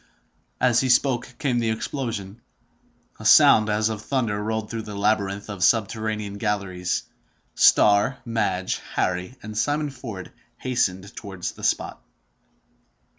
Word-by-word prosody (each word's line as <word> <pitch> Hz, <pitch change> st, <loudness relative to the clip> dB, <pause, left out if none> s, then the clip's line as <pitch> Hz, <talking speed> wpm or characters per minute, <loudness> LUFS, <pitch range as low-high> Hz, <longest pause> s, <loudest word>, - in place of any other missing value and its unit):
As 125 Hz, -2 st, +4 dB
he 130 Hz, -, -1 dB
spoke, 125 Hz, -1 st, +2 dB
came 125 Hz, -4 st, 0 dB
the 115 Hz, -1 st, 0 dB
explosion. 110 Hz, -2 st, -4 dB, 0.8 s
A -, -, -9 dB
sound 110 Hz, 0 st, +7 dB
as 105 Hz, +1 st, +1 dB
of 110 Hz, -1 st, -4 dB
thunder 110 Hz, -6 st, -1 dB
rolled 110 Hz, 0 st, -3 dB
through 115 Hz, -, -3 dB
the 105 Hz, -1 st, -8 dB
labyrinth 100 Hz, -1 st, 0 dB
of 100 Hz, -4 st, -4 dB
subterranean 110 Hz, -2 st, 0 dB
galleries. 100 Hz, -4 st, -2 dB, 0.5 s
Starr, 105 Hz, +6 st, +4 dB
Madge, 95 Hz, -6 st, -1 dB
Harry, 90 Hz, +6 st, -1 dB
and 110 Hz, 0 st, -7 dB
Simon 145 Hz, +5 st, 0 dB
Ford 115 Hz, -8 st, -8 dB, 0.3 s
hastened 100 Hz, -6 st, -1 dB
towards 95 Hz, -4 st, -5 dB
the -, -, -14 dB
spot. -, -, -1 dB
110 Hz, 125 wpm, -24 LUFS, 100-120 Hz, 0.8 s, sound